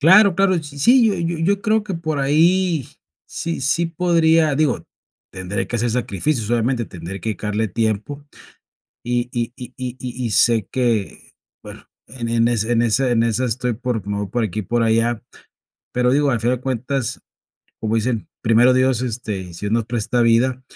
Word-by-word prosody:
Claro, 190 Hz, +5 st, +6 dB
claro, 195 Hz, -1 st, +3 dB
sí 145 Hz, -1 st, -10 dB
sí, 240 Hz, -, +5 dB
yo 200 Hz, -, 0 dB
yo 170 Hz, 0 st, -2 dB
yo 200 Hz, +2 st, +1 dB
creo 220 Hz, 0 st, +1 dB
que 200 Hz, -3 st, -5 dB
por 155 Hz, -3 st, -3 dB
ahí, 165 Hz, +2 st, +2 dB, 0.4 s
sí 165 Hz, -3 st, -4 dB
sí 165 Hz, +5 st, +1 dB
podría 165 Hz, -3 st, +2 dB
digo, 150 Hz, -3 st, 0 dB, 0.5 s
tendré 95 Hz, +1 st, -3 dB
que 120 Hz, -, -7 dB
hacer 120 Hz, +1 st, 0 dB
sacrificios, 115 Hz, +1 st, -1 dB
obviamente, 120 Hz, 0 st, +1 dB
tendré 90 Hz, +1 st, -8 dB
que 110 Hz, -, -2 dB
dedicarle 105 Hz, +1 st, -2 dB
tiempo, 110 Hz, +8 st, -2 dB, 0.8 s
y 120 Hz, 0 st, -1 dB
y 120 Hz, 0 st, -2 dB
y 125 Hz, 0 st, -9 dB
y 125 Hz, -1 st, -5 dB
y 125 Hz, -2 st, -4 dB
sé 115 Hz, -2 st, +3 dB
que 120 Hz, -6 st, -1 dB, 0.3 s
bueno, -, -, -11 dB, 0.2 s
en 120 Hz, -3 st, -5 dB
en 115 Hz, 0 st, +2 dB
ese 115 Hz, 0 st, 0 dB
en 115 Hz, 0 st, +3 dB
esa 125 Hz, +3 st, +2 dB
en 115 Hz, -1 st, +2 dB
esa 115 Hz, +2 st, 0 dB
estoy 125 Hz, 0 st, -1 dB
por 120 Hz, -4 st, -3 dB
me 100 Hz, -, -2 dB
voy 105 Hz, -, -2 dB
por 120 Hz, +3 st, -1 dB
aquí 110 Hz, 0 st, -2 dB
por 120 Hz, +5 st, 0 dB
allá, 115 Hz, +1 st, +1 dB, 0.7 s
pero 125 Hz, 0 st, +2 dB
digo, 140 Hz, +1 st, +2 dB
al 120 Hz, -, 0 dB
final 125 Hz, +2 st, +1 dB
de 125 Hz, -, -13 dB
cuentas, 130 Hz, 0 st, -2 dB, 0.6 s
como 110 Hz, 0 st, -1 dB
dicen: 115 Hz, 0 st, -1 dB
"Primero 120 Hz, +3 st, +4 dB
Dios, 130 Hz, -1 st, +2 dB
este, 105 Hz, -7 st, -4 dB
si 85 Hz, -, -10 dB
Dios 105 Hz, +1 st, -3 dB
nos 115 Hz, -1 st, +1 dB
presta 120 Hz, +1 st, -1 dB
vida", 120 Hz, +3 st, +2 dB
120 Hz, 180 wpm, -20 LUFS, 115-145 Hz, 0.8 s, Claro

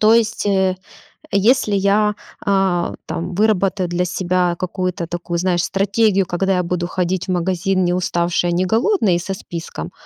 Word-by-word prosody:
То 215 Hz, +1 st, +6 dB
есть, 230 Hz, -1 st, +1 dB
э-э, 190 Hz, -2 st, +2 dB, 0.6 s
если 215 Hz, +3 st, +3 dB
я, 205 Hz, +2 st, +2 dB, 0.3 s
а-а, 195 Hz, -3 st, +1 dB
там 175 Hz, +2 st, -4 dB
выработаю 195 Hz, -3 st, +1 dB
для 175 Hz, +1 st, 0 dB
себя 180 Hz, 0 st, 0 dB
какую-то 185 Hz, -1 st, -3 dB
такую, 175 Hz, 0 st, -3 dB
знаешь, 175 Hz, -1 st, +1 dB
стратегию, 200 Hz, 0 st, +2 dB
когда 190 Hz, +2 st, 0 dB
я 180 Hz, -, +1 dB
буду 175 Hz, 0 st, -2 dB
ходить 180 Hz, 0 st, -2 dB
в 185 Hz, -, -1 dB
магазин 185 Hz, +1 st, 0 dB
неуставшей 175 Hz, -1 st, 0 dB
и -, -, 0 dB
неголодной 215 Hz, -, +2 dB
и -, -, 0 dB
со 190 Hz, +2 st, -4 dB
списком, 170 Hz, -, -7 dB
185 Hz, 155 wpm, -19 LUFS, 175-200 Hz, 0.6 s, То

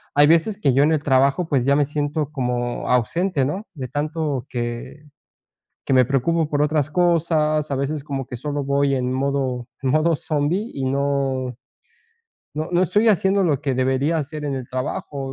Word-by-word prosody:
hay 145 Hz, 0 st, +6 dB
veces 170 Hz, +6 st, +3 dB
que 135 Hz, -10 st, +2 dB
yo 140 Hz, +2 st, +4 dB
en 155 Hz, -, +3 dB
el 155 Hz, -, +1 dB
trabajo 140 Hz, +5 st, +2 dB
pues 135 Hz, -6 st, +1 dB
ya 140 Hz, +1 st, +4 dB
me 145 Hz, -, +3 dB
siento 150 Hz, +1 st, -2 dB
como 125 Hz, -3 st, -2 dB
ausente 140 Hz, -, +1 dB
¿no?, 190 Hz, +10 st, -4 dB
de 130 Hz, -5 st, -6 dB
tanto 145 Hz, -1 st, -2 dB
que 120 Hz, +4 st, -5 dB, 0.8 s
que 135 Hz, -, +2 dB
me 130 Hz, -1 st, +6 dB
preocupo 150 Hz, +5 st, 0 dB
por 145 Hz, -1 st, 0 dB
otras 150 Hz, -1 st, +1 dB
cosas, 155 Hz, -3 st, +1 dB
a -, -, 0 dB
veces 140 Hz, +2 st, -2 dB
como 135 Hz, -3 st, -4 dB
que 125 Hz, -, -7 dB
solo 145 Hz, +3 st, -3 dB
voy 140 Hz, 0 st, +1 dB
en 125 Hz, -1 st, -1 dB
modo 130 Hz, -2 st, -1 dB
en 130 Hz, -, +1 dB
modo 155 Hz, +4 st, +3 dB
zombie 160 Hz, +11 st, -1 dB
y 135 Hz, -, -3 dB
no 135 Hz, -2 st, -1 dB, 1.0 s
no 155 Hz, +2 st, -3 dB
no 175 Hz, -, +3 dB
estoy 210 Hz, +5 st, +3 dB
haciendo 195 Hz, 0 st, +3 dB
lo 145 Hz, -5 st, +1 dB
que 135 Hz, -4 st, -1 dB
debería 130 Hz, +5 st, +1 dB
hacer 150 Hz, 0 st, -4 dB
en 140 Hz, -, -2 dB
el 130 Hz, -2 st, -5 dB
trabajo 130 Hz, +2 st, -4 dB
145 Hz, 185 wpm, -22 LUFS, 130-155 Hz, 1.0 s, hay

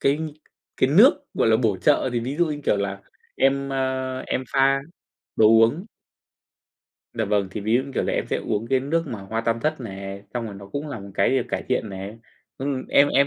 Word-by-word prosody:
cái 140 Hz, +2 st, +2 dB, 0.6 s
cái 130 Hz, -, +2 dB
nước, 255 Hz, -, +6 dB
gọi -, -, +2 dB
là, 110 Hz, -, +5 dB
bổ 110 Hz, -5 st, +1 dB
trợ. 130 Hz, +5 st, +2 dB
Thì 120 Hz, -, 0 dB
ví 135 Hz, +5 st, -4 dB
dụ, 175 Hz, -, +3 dB
như 150 Hz, -1 st, -4 dB
kiểu -, -, +3 dB
là, 100 Hz, 0 st, -3 dB, 0.4 s
em, 140 Hz, +1 st, +2 dB
ờ, 130 Hz, -1 st, -2 dB
em 130 Hz, -, -2 dB
pha 135 Hz, 0 st, +4 dB, 0.6 s
đồ 110 Hz, -, +6 dB
uống. 115 Hz, -, +4 dB, 1.3 s
Dạ 110 Hz, -2 st, -1 dB
vâng, 100 Hz, -2 st, 0 dB
thì 105 Hz, -, -5 dB
ví 110 Hz, +3 st, 0 dB
dụ, 130 Hz, -, +3 dB
như 140 Hz, -, -9 dB
kiểu -, -, +1 dB
là, -, -, -1 dB
em -, -, -1 dB
sẽ -, -, -1 dB
uống 110 Hz, +2 st, -2 dB
cái 130 Hz, 0 st, +2 dB
nước 165 Hz, +4 st, -1 dB
mà 110 Hz, -7 st, -5 dB
hoa 110 Hz, +4 st, -3 dB
tam 115 Hz, 0 st, -1 dB
thất 155 Hz, -2 st, -1 dB
này, 100 Hz, -2 st, -7 dB
xong 120 Hz, -2 st, -2 dB
rồi 100 Hz, -, -7 dB
nó 100 Hz, 0 st, -10 dB
cũng 145 Hz, +7 st, -5 dB
là 130 Hz, -, -5 dB
một 100 Hz, 0 st, -10 dB
cái 100 Hz, -, +3 dB
để 130 Hz, -2 st, +2 dB
cải -, -, -2 dB
thiện 125 Hz, -4 st, 0 dB
nè. 100 Hz, +3 st, -7 dB, 0.4 s
Ừm, 135 Hz, -1 st, -3 dB
em 145 Hz, +1 st, +5 dB
em 140 Hz, 0 st, +4 dB
125 Hz, 230 wpm, -24 LUFS, 105-140 Hz, 1.3 s, nước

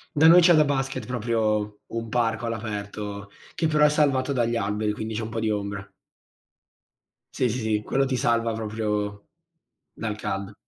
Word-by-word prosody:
Da 160 Hz, +2 st, +5 dB
noi 175 Hz, +2 st, +9 dB
c'è 170 Hz, 0 st, +6 dB
da 155 Hz, -1 st, +6 dB
basket, 135 Hz, -4 st, -2 dB
proprio 110 Hz, -3 st, -1 dB
un 115 Hz, 0 st, -4 dB
parco 115 Hz, -1 st, 0 dB
all'aperto 105 Hz, -2 st, -5 dB, 0.2 s
che 160 Hz, -, 0 dB
però 150 Hz, -1 st, +4 dB
è -, -, +5 dB
salvato 140 Hz, -3 st, +2 dB
dagli 120 Hz, -1 st, +1 dB
alberi, 105 Hz, 0 st, -1 dB
quindi 110 Hz, +1 st, -5 dB
c'è 110 Hz, -, -2 dB
un 110 Hz, -, -4 dB
po' 115 Hz, -, -3 dB
di 110 Hz, -, 0 dB
ombra. 100 Hz, -1 st, -3 dB, 1.5 s
Sì, 125 Hz, -, +1 dB
sì, 120 Hz, -, -2 dB
sì. 110 Hz, -1 st, 0 dB
Quello 135 Hz, +4 st, +1 dB
ti 130 Hz, -1 st, -1 dB
salva 115 Hz, -3 st, +1 dB
proprio 105 Hz, -2 st, -3 dB, 0.7 s
dal 110 Hz, -2 st, -4 dB
caldo. 100 Hz, -1 st, -4 dB
110 Hz, 170 wpm, -25 LUFS, 105-130 Hz, 1.5 s, noi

